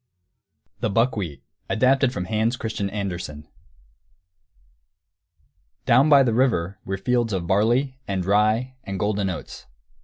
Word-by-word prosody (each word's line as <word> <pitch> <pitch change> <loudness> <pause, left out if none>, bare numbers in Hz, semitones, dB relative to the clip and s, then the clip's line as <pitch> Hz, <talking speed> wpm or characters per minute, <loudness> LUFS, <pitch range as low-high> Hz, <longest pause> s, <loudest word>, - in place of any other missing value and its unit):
THE - - -1
BUCKWHEAT 100 - -1
[Footnote 80 +4 -47
1: - - -1
Adapted 130 +2 +3
from 90 -8 -4
Hans 110 +4 0
Christian 110 -4 -3
Andersen.] 90 -7 -5 2.4
Down 130 +6 +5
by 140 -2 +7
the 120 -3 +1
river 105 -7 +1
were 95 0 -3
fields 120 +2 0
of 90 -3 -2
barley 120 +8 +1
and 95 -2 -2
rye 110 +6 +2
and 95 -4 -5
golden 105 -2 0
oats. 85 -6 -7
105 Hz, 130 wpm, -23 LUFS, 95-125 Hz, 2.4 s, by